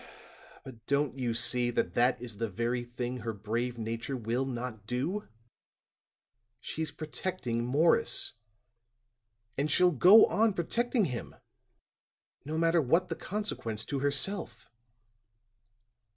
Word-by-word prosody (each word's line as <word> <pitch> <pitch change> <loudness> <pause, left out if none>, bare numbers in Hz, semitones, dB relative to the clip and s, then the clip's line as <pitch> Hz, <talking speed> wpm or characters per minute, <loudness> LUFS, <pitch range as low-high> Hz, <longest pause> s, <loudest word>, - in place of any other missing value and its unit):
"But 120 -4 -12
don't 140 -1 +1
you 120 -3 -1
see 120 +1 +2
that 120 - -1
that 125 +1 +2
is 120 -4 -8
the 115 0 -2
very 120 +4 -1
thing 120 +1 -4
that - - -9
her 115 0 -3
brave 115 +4 -3
nature 115 +4 -4
will 120 +3 -1
not 120 -5 -5
do? 150 - -2 1.3
She's 160 +5 -4
protecting 150 -5 -4
Morris; 145 +7 +2 1.3
and 145 +2 +1
she'll 180 +2 +4
go 185 - +8
on 220 0 +2
protecting 235 +6 +1
him, 125 -6 -5 1.1
no 155 +3 -4
matter 165 0 +3
what 165 +7 +2
the - - -2
consequence 150 - -4
to 140 - -3
herself." 145 +7 -1
130 Hz, 125 wpm, -30 LUFS, 120-165 Hz, 1.3 s, go